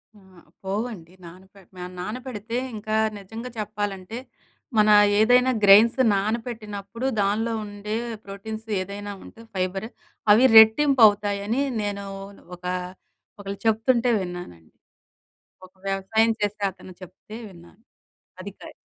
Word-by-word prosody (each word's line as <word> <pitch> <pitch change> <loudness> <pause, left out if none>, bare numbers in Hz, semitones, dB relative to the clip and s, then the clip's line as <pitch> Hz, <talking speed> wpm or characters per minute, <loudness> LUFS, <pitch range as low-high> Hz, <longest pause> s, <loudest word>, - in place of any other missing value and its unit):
ఆ! - - -18 0.4
పోవండి 195 -3 -4
నానపె 190 +3 -15 0.4
నానపెడితే 230 +2 -5 0.2
ఇంకా 215 0 -3 0.2
నిజంగా 225 +5 -8
చెప్పాలంటే, 205 0 -4 0.6
మన 215 0 +5 0.3
ఏదైనా 250 +3 +5
గ్రేయిన్స్ 215 +6 +7
నానబెట్టినప్పుడు 215 +1 -4 0.2
దానిలో 220 +3 0
ఉండే 205 +1 -5 0.3
ప్రోటీన్స్ 220 +3 -8
ఏదైనా 205 +2 -6
ఉంటే, 230 - -14
ఫైబరు 190 +4 -2 0.4
అవి 235 +5 +5
రెట్టింపు 240 +3 +7
అవుతాయని, 205 +4 -1 0.2
నేను 200 -1 -4 0.5
ఒక 180 - -15 0.7
ఒకళ్ళు 200 0 -6
చెప్తుంటే 230 +2 +2
విన్నానండి. 175 - -8 0.9
ఒక 185 - -28
వ్యవసాయం 205 +4 +1
చేసే 205 0 -2
అతను 185 0 -13
చెప్తే 185 +4 -11
విన్నాను. 175 +3 -17 0.6
అదికాయ్ - - -10
210 Hz, 100 wpm, -24 LUFS, 195-225 Hz, 0.9 s, గ్రేయిన్స్